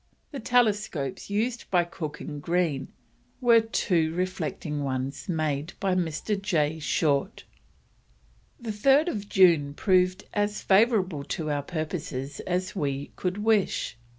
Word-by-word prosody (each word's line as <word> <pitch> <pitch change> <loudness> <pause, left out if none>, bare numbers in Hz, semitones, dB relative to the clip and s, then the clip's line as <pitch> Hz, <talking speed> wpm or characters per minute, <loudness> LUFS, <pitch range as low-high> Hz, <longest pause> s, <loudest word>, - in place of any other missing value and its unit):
The 280 - -5
telescopes 210 - 0
used 230 +4 -2
by 175 -2 +3
Cook 160 -3 -6
and 145 -2 -6
Green 165 -5 0 0.5
were 235 -2 +6
two 180 -7 +1
reflecting 175 -5 -3
ones 135 +4 -3
made 155 -1 -1
by 195 -2 +1
Mr. 180 +4 -1
J. 160 -6 0
Short. 150 +3 0 1.2
"The 235 -3 -4
3rd 275 +10 +4
of 205 -8 -5
June 165 -7 +4
proved 185 +1 +2
as 205 0 -1
favourable 190 - +3
to 155 -4 -3
our 145 -1 0
purposes 150 -3 -4
as 185 +2 -1
we 140 -5 -2
could 190 +3 -3
wish. 215 - +1
180 Hz, 125 wpm, -27 LUFS, 150-205 Hz, 1.2 s, were